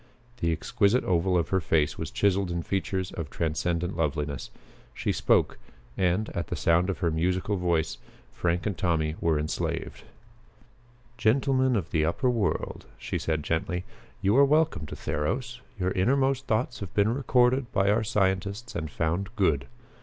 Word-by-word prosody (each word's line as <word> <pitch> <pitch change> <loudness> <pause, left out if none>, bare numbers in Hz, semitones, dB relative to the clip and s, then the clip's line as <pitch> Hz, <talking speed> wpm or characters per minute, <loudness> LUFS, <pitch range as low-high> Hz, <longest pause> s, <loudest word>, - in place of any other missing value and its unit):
The 85 -6 0
exquisite 100 +8 +1
oval 90 +1 +2
of 85 - 0
her 95 - +2
face 80 -2 +1
was - - -5
chiseled 100 -2 +1
in 85 -1 -2
features 95 -1 -2
of 80 -4 -5
transcendent 85 +3 -1
loveliness. 75 -4 -2 0.5
She - - -1
spoke, - - +2 0.4
and, 95 +4 +1
at 85 - -4
sound 85 +3 +3
of 95 - -1
her 85 - +2
musical 90 +5 0
voice, 85 -3 0 0.3
Frank 85 0 -1
and 100 -3 -1
Tommy 80 -3 0
were 80 -2 +2
enslaved. 75 +1 -3 1.2
"Gentlemen 130 +2 +3
of 95 -6 -2
the 80 -2 +2
upper 125 - +1
world," 110 -5 -2
she - - -3
said 80 -2 -1
gently, 90 +3 -1 0.4
"you 100 +3 +3
are 140 - +8
welcome 150 - +2
to - - -7
Theros. 120 - -2 0.2
Your 90 0 0
innermost 135 +7 +1
thoughts 120 +2 0
have 100 -5 -6
been 105 +2 +3
recorded 125 -1 +2
by 100 +1 +3
our 110 +2 +2
scientists 100 +3 -1
and 80 -2 -3
found 85 +6 -1
good. 80 - +1
95 Hz, 155 wpm, -27 LUFS, 80-110 Hz, 1.2 s, are